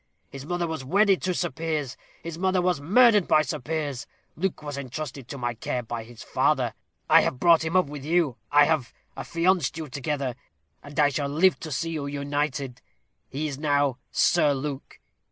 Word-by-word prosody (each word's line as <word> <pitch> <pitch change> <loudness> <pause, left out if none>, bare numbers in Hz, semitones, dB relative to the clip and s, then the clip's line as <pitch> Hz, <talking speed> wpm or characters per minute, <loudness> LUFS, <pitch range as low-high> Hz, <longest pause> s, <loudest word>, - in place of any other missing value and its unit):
His 135 +1 -9
mother 175 0 -1
was 160 -4 -4
wedded 195 +6 +3
to 185 - 0
Sir 175 -1 -1
Piers; 150 -4 -3 0.3
his 165 0 -5
mother 185 0 +2
was 180 -5 +1
murdered 210 - +5
by 155 - +4
Sir 145 - -4
Piers. 145 -3 -3 0.3
Luke 180 -2 -2
was 145 -1 -5
entrusted 140 -1 -6
to 140 - -7
my 120 -2 -2
care 125 +2 -3
by 115 0 -5
his 120 0 -12
father. - - +1 0.3
I - - +7
have 125 - -2
brought 170 0 +5
him 160 +2 -3
up 185 - +5
with 145 -1 -8
you. 155 -5 +1
I 145 0 +7
have 155 -5 -1 0.2
affianced 170 -2 0
you 160 -2 -5
together; 140 -1 -2 0.5
and 145 +1 -7
I 145 -1 +5
shall 140 0 -2
live 170 +6 +3
to 155 - -7
see 165 +4 -2
you 150 -3 -3
united. 140 -2 -3 0.5
He 150 +3 -3
is 140 -2 -6
now 145 -3 +1
Sir 150 -5 +3
Luke. 140 0 -6
150 Hz, 190 wpm, -26 LUFS, 135-165 Hz, 0.5 s, I